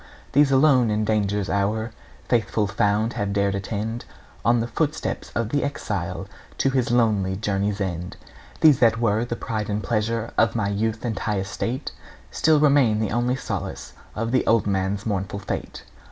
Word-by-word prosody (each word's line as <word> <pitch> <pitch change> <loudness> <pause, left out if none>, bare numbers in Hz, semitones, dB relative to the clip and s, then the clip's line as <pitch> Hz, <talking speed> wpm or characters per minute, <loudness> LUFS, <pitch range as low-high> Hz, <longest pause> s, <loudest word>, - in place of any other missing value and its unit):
These 145 0 +4
alone 135 -4 +5
in 105 0 0
danger's 105 -2 0
hour 105 +3 0 0.4
Faithful 110 -2 +1
found, 105 +3 +1
have 100 -4 -2
dared 100 -1 +1
attend 110 +4 -3 0.4
On 120 0 +3
the 115 - 0
footsteps 150 +5 -2
of 115 -2 0
the 145 +3 0
exile 145 - -3 0.3
To 135 - +2
his 130 -3 +1
lonely 105 -6 +2
journey's 100 0 -1
end. 90 -2 -4 0.4
These 150 -5 +6
that 115 -2 +4
were 110 -1 +2
the 120 - -3
pride 110 -3 -3
and 105 0 -2
pleasure 115 +1 -1
Of 115 0 +3
my 105 -3 0
youth 110 +3 -1
and 110 -5 -2
high 105 -2 -1
estate 115 +8 -3 0.4
Still 155 +1 +3
remain 140 -7 +4
the 110 -2 -1
only 120 +3 +1
solace 135 - -5 0.2
Of 115 +1 -2
the 130 - +2
old 115 -2 +4
man's 100 0 -1
mournful 100 -2 -2
fate. 100 - -5
110 Hz, 170 wpm, -24 LUFS, 100-120 Hz, 0.4 s, These